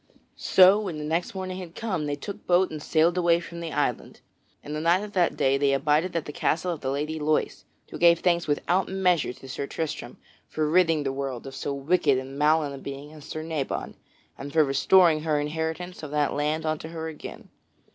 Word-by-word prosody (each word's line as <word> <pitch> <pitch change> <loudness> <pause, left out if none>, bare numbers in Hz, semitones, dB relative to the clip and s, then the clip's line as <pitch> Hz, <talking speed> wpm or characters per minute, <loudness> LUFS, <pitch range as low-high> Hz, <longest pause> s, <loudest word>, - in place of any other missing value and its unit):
So 190 +2 +6
when 190 -7 -4
the 150 - -5
next 165 +5 -2
morning 185 -1 -4
had 175 -2 -9
come 185 -10 -2
they 145 - -1
took 195 +8 -8
boat 180 +1 +3
and 155 -1 -6
sailed 165 +4 +2
away 170 -1 +3
from 170 0 -9
that 165 -2 -5
island. - - -2 0.4
And 150 - -6
the 155 - -3
night 175 +4 +3
of 210 -1 -8
that 180 -3 +1
day 135 +1 +2
they 140 -1 +3
abided 150 +6 +1
at 165 - -1
the - - -6
castle 170 +5 0
of 160 - -9
the 130 - -2
Lady 150 +3 -2
Loise, 155 +1 -1 0.3
who - - -7
gave 170 0 +6
thanks 170 -1 +1
without 175 +5 0
measure 180 -6 +1
to 135 - -13
Sir 140 +1 -4
Tristram 150 -6 -5 0.3
for 155 -1 -1
ridding 165 -2 +3
the 135 -1 -2
world 135 -3 -4
of 135 - -8
so 140 - -4
wicked 140 0 +2
and 135 +2 -6
malign 150 -1 +2
a 135 - -8
being 140 +2 -8
as 150 -2 -12
Sir 155 - -6
Nabon, 160 -4 -3 0.5
and 140 +1 -7
for 155 +1 +4
restoring 160 +4 +4
her 155 -2 0
inheritance 160 +4 -4
of 150 - -7
that 150 0 0
land 150 +2 -1
unto 155 0 -2
her 160 0 -5
again. 160 -2 -9
155 Hz, 215 wpm, -26 LUFS, 145-175 Hz, 0.5 s, So